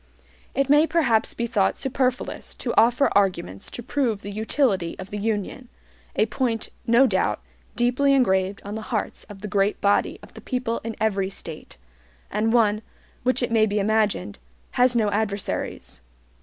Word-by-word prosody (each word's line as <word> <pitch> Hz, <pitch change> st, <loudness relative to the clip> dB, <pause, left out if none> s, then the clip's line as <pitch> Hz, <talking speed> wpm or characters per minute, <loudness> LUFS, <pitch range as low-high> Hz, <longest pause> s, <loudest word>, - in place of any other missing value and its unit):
It 275 Hz, -1 st, +2 dB
may 295 Hz, +3 st, +5 dB
perhaps 240 Hz, -11 st, +2 dB
be 235 Hz, -, -1 dB
thought 215 Hz, -5 st, +1 dB
superfluous 260 Hz, -1 st, -2 dB
to 240 Hz, -, -3 dB
offer 240 Hz, +5 st, +4 dB
arguments 180 Hz, -, 0 dB
to 240 Hz, -, -7 dB
prove 235 Hz, -6 st, -1 dB
the 205 Hz, -, -6 dB
utility 215 Hz, -, 0 dB
of 190 Hz, 0 st, -9 dB
the 205 Hz, -, -3 dB
UNION, 220 Hz, +4 st, -2 dB, 0.5 s
a 215 Hz, -, +3 dB
point, 225 Hz, 0 st, -2 dB, 0.2 s
no 235 Hz, +4 st, +6 dB
doubt, -, -, +1 dB, 0.4 s
deeply 255 Hz, +3 st, +3 dB
engraved 190 Hz, -6 st, +1 dB
on 205 Hz, -, -5 dB
the 220 Hz, -, -4 dB
hearts 225 Hz, -4 st, -3 dB
of 200 Hz, -2 st, -12 dB
the 210 Hz, -, -4 dB
great 200 Hz, +1 st, +1 dB
body 200 Hz, 0 st, +2 dB
of -, -, -14 dB
the -, -, -11 dB
people 250 Hz, -3 st, -2 dB
in 225 Hz, 0 st, -4 dB
every 200 Hz, -3 st, +1 dB
State, 160 Hz, -, -9 dB, 0.5 s
and 220 Hz, +1 st, +1 dB
one, 215 Hz, -3 st, +3 dB, 0.4 s
which 255 Hz, 0 st, +1 dB
it 240 Hz, -, -1 dB
may 220 Hz, -1 st, +4 dB
be 205 Hz, 0 st, -1 dB
imagined, 205 Hz, -, 0 dB, 0.3 s
has 250 Hz, 0 st, +3 dB
no 215 Hz, -3 st, +2 dB
adversaries. 205 Hz, -, -3 dB
220 Hz, 165 wpm, -24 LUFS, 200-245 Hz, 0.5 s, no